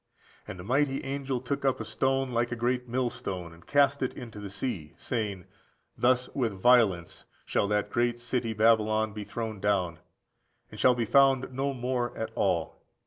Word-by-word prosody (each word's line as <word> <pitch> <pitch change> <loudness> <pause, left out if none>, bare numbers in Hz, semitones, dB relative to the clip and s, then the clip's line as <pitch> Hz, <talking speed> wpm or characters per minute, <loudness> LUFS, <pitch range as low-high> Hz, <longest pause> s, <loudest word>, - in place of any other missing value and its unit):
And - - -7
a - - -7
mighty 135 +5 +1
angel 135 -1 -2
took 140 +2 -3
up 135 -1 +1
a - - -4
stone 135 0 0
like 120 0 0
a - - -1
great 125 +1 -1
millstone, 100 -8 -3
and 85 0 -18
cast 140 -1 +3
it 130 - -1
into 115 -4 -8
the 100 -1 -6
sea, 95 - -4
saying, 105 -7 -3 0.5
Thus 125 0 +2
with 120 -6 0
violence 100 -5 +3 0.2
shall 100 - +1
that 105 0 0
great 120 0 +1
city 120 -1 -2
Babylon 110 -1 +3
be 105 0 -5
thrown 110 +1 -5
down, 95 -4 0 0.7
and - - -10
shall 125 -1 +5
be 120 -1 0
found 135 +2 +4
no 135 +2 -1
more 125 -1 -2
at 110 0 -3
all. 90 -7 -1
120 Hz, 175 wpm, -28 LUFS, 105-130 Hz, 0.7 s, shall